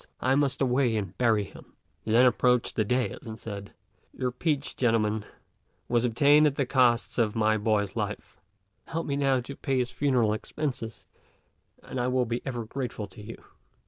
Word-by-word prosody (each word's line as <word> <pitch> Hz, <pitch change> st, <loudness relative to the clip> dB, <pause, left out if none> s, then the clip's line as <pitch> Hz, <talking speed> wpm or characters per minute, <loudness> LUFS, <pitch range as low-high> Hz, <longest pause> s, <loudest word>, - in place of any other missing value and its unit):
I 130 Hz, -, +2 dB
must 140 Hz, -1 st, +1 dB
away 125 Hz, -3 st, +2 dB
and 100 Hz, -3 st, -4 dB
bury 115 Hz, -4 st, +3 dB
him." 95 Hz, -, -14 dB, 0.3 s
He 110 Hz, -, -4 dB
then 120 Hz, +3 st, +6 dB
approached 125 Hz, -1 st, +2 dB
the 110 Hz, -, +2 dB
dais 125 Hz, +4 st, -1 dB
and 110 Hz, 0 st, -6 dB
said, 100 Hz, -2 st, -7 dB, 0.5 s
"Your 125 Hz, -1 st, -1 dB
peach, 145 Hz, +2 st, -2 dB
gentlemen, 110 Hz, -3 st, +1 dB, 0.6 s
was 120 Hz, 0 st, +2 dB
obtained 145 Hz, +6 st, +5 dB
at 140 Hz, -, -1 dB
the 140 Hz, -, 0 dB
cost 125 Hz, -2 st, +2 dB
of 110 Hz, -2 st, +1 dB
my 110 Hz, -1 st, +3 dB
boy's 105 Hz, -2 st, 0 dB
life; 105 Hz, -2 st, -5 dB, 0.5 s
help 165 Hz, 0 st, -3 dB
me 140 Hz, -, -1 dB
now 135 Hz, -2 st, +2 dB
to 140 Hz, +3 st, -8 dB
pay 135 Hz, -1 st, -1 dB
his 125 Hz, -1 st, 0 dB
funeral 125 Hz, -7 st, +2 dB
expenses, 125 Hz, -1 st, -5 dB, 0.8 s
and 130 Hz, -, -5 dB
I 125 Hz, -, 0 dB
will 125 Hz, 0 st, +1 dB
be 120 Hz, +1 st, -3 dB
ever 120 Hz, -4 st, -3 dB
grateful 120 Hz, -3 st, -4 dB
to 105 Hz, -, -12 dB
you." 115 Hz, +2 st, -10 dB
120 Hz, 175 wpm, -27 LUFS, 110-130 Hz, 0.8 s, then